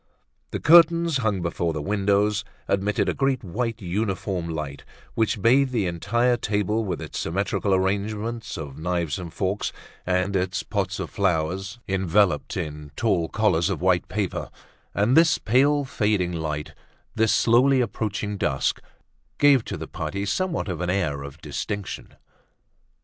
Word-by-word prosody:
The - - -4
curtains 170 -1 +6
hung 105 -7 0
before 85 -1 -1
the 75 - -3
windows 100 +2 +1 0.2
admitted 100 +1 +1
a - - +1
great 135 -2 0
white 115 +4 -3
uniform 95 -2 -2
light 75 -3 -5 0.3
which 110 -2 0
bathed 130 +3 +4
the 115 -6 0
entire 120 +8 +1
table 105 0 0
with 90 -5 -3
its - - -6
symmetrical 100 +3 -1
arrangement 105 +4 -1
of 75 -3 -7
knives 85 0 -1
and 85 -2 -7
forks 95 +4 -2 0.3
and 90 +2 0
its 95 0 -1
pots 95 -3 -2
of - - -4
flowers 95 +3 -1
enveloped 95 -3 +1
in 75 -1 -5
tall 95 -7 +1
collars 100 -5 +2
of 95 - -2
white 90 -1 +2
paper; 105 -4 -3 0.5
and 105 +6 +3
this 160 -1 +5
pale 140 +5 +3
fading 105 -7 0
light, 75 -2 -4 0.4
this 110 0 +2
slowly 130 +3 +4
approaching 105 -3 -2
dusk, 70 -7 0 0.6
gave 140 -4 +5
to - - -4
the - - -6
party 100 0 -4
somewhat 170 - -1
of 90 -3 -3
an 90 - -1
air 90 -7 0
of 70 +2 -9
distinction. 100 -2 -5
100 Hz, 145 wpm, -24 LUFS, 90-115 Hz, 0.6 s, curtains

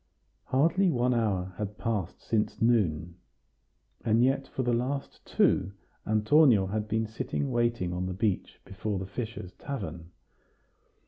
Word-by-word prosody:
Hardly 165 +9 +3
one 125 -4 +2
hour 95 -6 0
had 105 0 -4
passed 105 -8 -3
since 110 -2 0
noon, 90 -8 +1 0.9
and 115 +1 +3
yet 135 +1 +1
for 130 - -3
the 120 -1 +1
last 135 +4 -2
two 95 +2 +2 0.3
Antonio 110 0 +5
had 105 +2 -2
been 110 +1 0
sitting 115 +5 -3
waiting 120 -7 0
on 90 +1 -2
the 95 - -3
bench 100 0 -1
before 100 +1 -3
the 95 - -4
fishers' 105 -3 -6
tavern. 85 - -6
110 Hz, 135 wpm, -29 LUFS, 95-125 Hz, 0.9 s, Antonio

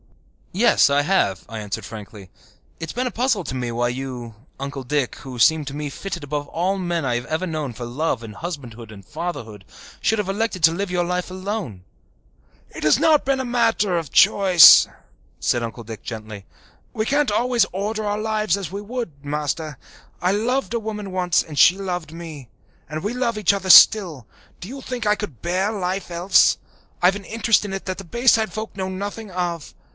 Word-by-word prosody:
"Yes, 220 -4 +4
I 140 +1 +2
have," 145 - +1
I 115 -1 -6
answered 105 -2 -5
frankly. 105 -3 -10 0.5
"It 165 - -5
has - - -6
been 250 +2 -1
a - - -3
puzzle 235 -5 0
to 130 - -4
me 125 -2 -3
why 120 +1 0
you, 125 -2 -6 0.3
Uncle 140 0 -5
Dick, 130 -2 -1
who 130 -2 -9
seem 160 +5 +4
to 135 0 -6
me 145 -1 -4
fitted 180 -2 -6
above 145 0 -4
all 185 +4 -1
men 175 -4 -2
I 120 -2 0
have 120 - -4
ever 160 +4 -2
known 155 -5 -3
for 120 +1 -7
love 130 +2 -2
and 105 -2 -9
husbandhood 120 -9 -7
and 100 -3 -13
fatherhood, 115 - -6 0.4
should 220 - +1
have 210 -3 -2
elected 200 -1 -2
to 160 - +7
live 195 +1 -3
your 175 -1 0
life 180 +1 -2
alone." 185 - -5 0.9
"It - - -8
has 150 -1 +4
not 310 -2 +4
been 270 0 0
a 260 - -2
matter 225 -6 +1
of 165 -5 -4
choice," 185 -4 +8 0.5
said 120 - 0
Uncle 115 +1 -6
Dick 110 -1 -9
gently. 110 -3 -8 0.5
"We 215 - -1
can't 285 -1 +1
always 240 0 +2
order 210 +4 -3
our 205 0 -1
lives 215 -1 0
as 190 -5 -6
we 200 +1 -5
would, 205 - -6
Master. 150 0 -3 0.4
I 180 - +1
loved 240 +5 -1
a 235 - 0
woman 210 -3 -6
once 180 -2 +1
and 150 -2 -10
she 180 - +6
loved 180 -5 -4
me. 160 -7 -9 0.4
And 155 0 -5
we 210 - -2
love 245 -3 -1
each 205 -2 +3
other 195 -1 -4
still. 180 - +7 0.3
Do 180 - -8
you 270 +4 -8
think 250 -3 -5
I 210 0 +3
could 200 - -8
bear 185 +4 0
life 190 -2 -3
else? 175 +3 +4 0.5
I've 185 +2 +5
an 205 - -7
interest 225 0 +2
in 205 - -5
it 195 0 -5
that 185 0 -4
the - - -7
Bayside 230 +3 +2
folk 220 -1 -6
know 190 -1 -3
nothing 205 +3 -6
of. 175 -4 -4
180 Hz, 200 wpm, -22 LUFS, 140-210 Hz, 0.9 s, choice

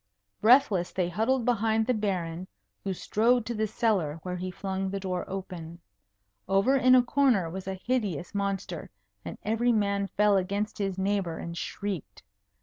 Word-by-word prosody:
Breathless 215 -6 +5
they 180 -2 -1
huddled 225 +7 +1
behind 225 -2 +2
the 250 - +2
Baron, 185 -5 -2 0.4
who 195 - -2
strode 230 +5 +2
to 240 - -3
the 220 -1 0
cellar, 205 -9 0
where 180 -1 -3
he 185 +1 -4
flung 190 +1 -3
the 195 +1 -3
door 185 -2 -2
open. 175 -3 -7 0.7
Over 200 +8 +3
in 255 -1 +6
a 250 - +6
corner 240 -10 +2
was 190 +1 -6
a 190 - -2
hideous 195 - -2
monster, 195 -4 -3 0.3
and - - -7
every 225 +3 +2
man 200 -2 +1
fell 205 0 +3
against 200 +4 -2
his 195 -2 -1
neighbour 190 -4 0
and 170 0 -6
shrieked. 195 0 -5
200 Hz, 160 wpm, -28 LUFS, 185-225 Hz, 0.7 s, in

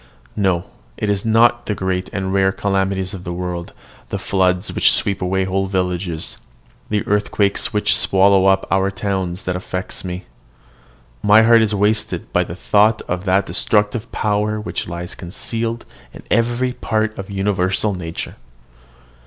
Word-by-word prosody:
No: 95 -4 +1 0.3
it 105 - -2
is 100 -1 0
not 115 +2 +3
the 105 - -1
great 95 -1 -2
and 95 -2 -2
rare 95 -1 +3
calamities 95 -1 -1
of 95 -2 -7
the 85 - -5
world, 90 -1 -4 0.4
the - - -2
floods 90 0 0
which - - +4
sweep 100 -1 0
away 95 +1 0
whole 95 +1 0
villages, 90 -3 -2 0.5
the 105 -1 0
earthquakes 105 -1 +1
which 105 - +2
swallow 95 0 +4
up 95 0 +3
our 95 0 +2
towns, 95 -1 -3
that 90 -5 -2
affect 90 0 -4
me. 90 0 -5 1.0
My 105 +2 +6
heart 115 0 +6
is 110 -1 +1
wasted 105 +2 0
by - - +3
the 85 - -7
thought 105 +4 +3
of 90 +2 -4
that 95 +1 +2
destructive 105 +3 0
power 105 0 0
which 105 - -4
lies 85 +1 -5
concealed 115 +6 -4 0.3
in - - -11
every 120 +3 +1
part 110 -2 -1
of 95 0 -7
universal 95 0 0
nature. 85 -3 -6
95 Hz, 155 wpm, -19 LUFS, 90-105 Hz, 1.0 s, My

